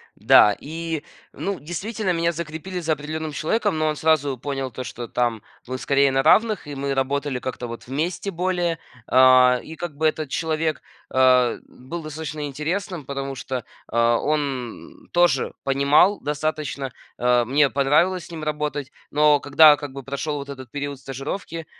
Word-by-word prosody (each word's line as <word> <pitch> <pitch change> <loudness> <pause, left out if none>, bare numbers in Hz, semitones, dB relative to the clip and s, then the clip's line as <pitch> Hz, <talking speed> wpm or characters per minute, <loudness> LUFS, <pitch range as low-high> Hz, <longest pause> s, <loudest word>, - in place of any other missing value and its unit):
Да, 105 -2 +6
и, 160 0 -4 0.3
ну, 190 +5 -3
действительно, 190 +5 -3
меня 170 0 +1
закрепили 170 +3 -5
за 165 -2 -2
определенным 155 +1 -5
человеком, 185 +4 0
но 155 - +1
он 155 - 0
сразу 145 -4 +1
понял, 135 +1 -3
то 130 +1 -6
что 120 -1 -7
там 120 -2 -1 0.3
мы 130 +1 -4
скорее 140 0 +3
на 135 0 +2
равных, 215 +3 +3
и 145 - -6
мы 140 0 -2
работали 135 0 -1
как-то 125 -1 -5
вот 115 0 -8
вместе 165 +9 -2
более. 175 -2 -1 0.3
А, 130 -1 +6
и 160 - -9
как 165 -3 -6
бы 160 - 0
этот 155 -2 -2
человек, 160 +1 -1 0.3
а, 130 -2 +4
был 160 +7 -8
достаточно 155 -1 -5
интересным, 160 +4 -3
потому 135 0 -4
что, 130 -2 -5 0.2
а, 115 0 +2
он 140 -6 -3
тоже 175 -6 +2
понимал 140 +8 +4
достаточно, 145 -3 -3 0.2
э, 125 0 +3
мне 140 +3 +3
понравилось 155 +7 +2
с - - -14
ним 160 -2 -6
работать. 150 -2 -3 0.2
Но 150 0 +4
когда, 145 +2 +6
как 145 -2 -7
бы, 135 0 -7
прошел 140 +3 -3
вот 140 0 -7
этот 130 -3 -8
период 145 0 -5
стажировки, 150 +5 -6
145 Hz, 160 wpm, -23 LUFS, 135-160 Hz, 0.3 s, Да